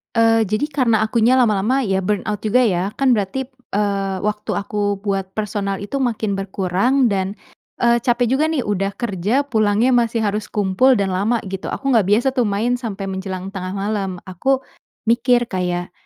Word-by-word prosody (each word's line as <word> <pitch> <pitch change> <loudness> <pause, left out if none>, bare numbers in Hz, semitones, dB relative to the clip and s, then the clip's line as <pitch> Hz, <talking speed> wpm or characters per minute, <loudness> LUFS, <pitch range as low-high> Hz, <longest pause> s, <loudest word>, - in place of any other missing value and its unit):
Eee, 225 -1 +4
jadi 215 +8 0
karena 235 -6 +2
akunya 230 +3 +3
lama-lama 245 +2 +2
ya 195 -4 0
burn 195 +1 -1
out 210 -1 -2
juga 250 +4 +4
ya. 195 -2 0
Kan 270 -2 +2
berarti 215 +3 0
p - - -40 0.2
eee, 200 -2 0
waktu 210 0 -2
aku 205 0 -1
buat 195 -2 -2
personal 200 -2 -2
itu 275 +7 -3
makin 225 -5 -1
berkurang 195 +7 +1
dan, 195 0 -1 0.5
eee, 235 0 +4
capek 240 +1 +1
juga 310 +2 +2
nih 315 -5 -1
udah 200 -1 -2
kerja 215 +5 0
pulangnya 220 -2 +2
masih 235 -2 +2
harus 210 0 -1
kumpul 210 +6 +3
dan 195 -3 0
lama 205 +6 +1
gitu. 195 -1 -5
Aku 275 0 -2
nggak 220 -7 +3
biasa 215 +6 +3
tuh 250 -4 +1
main 230 +5 0
sampai 210 -5 -5
menjelang 190 0 -5
tengah 185 -1 -5
malam. 200 0 -2
Aku 265 +9 -1 0.4
mikir 240 +1 +3
kayak, 180 -1 -2
210 Hz, 175 wpm, -20 LUFS, 195-240 Hz, 0.5 s, Eee